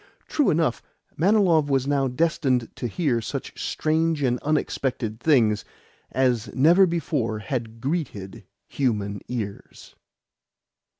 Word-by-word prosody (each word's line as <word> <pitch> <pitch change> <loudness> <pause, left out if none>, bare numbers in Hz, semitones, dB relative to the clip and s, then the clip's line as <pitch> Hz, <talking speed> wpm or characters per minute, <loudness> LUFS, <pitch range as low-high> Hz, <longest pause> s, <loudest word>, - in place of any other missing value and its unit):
True 295 -4 +2
enough, 155 -6 +1 0.3
Manilov 175 -4 +3
was 135 -2 +2
now 140 -1 +1
destined 130 -3 0
to 120 - -2
hear 125 - 0
such 110 - -6
strange 160 -1 0
and 125 -2 +1
unexpected 130 -6 -1
things 115 -8 +3 0.5
as 125 -4 +1
never 170 +8 +6
before 145 -10 -1
had 115 0 -4
greeted 130 - -4 0.2
human 105 -7 -1
ears. 110 -5 -6
135 Hz, 110 wpm, -24 LUFS, 115-160 Hz, 0.5 s, never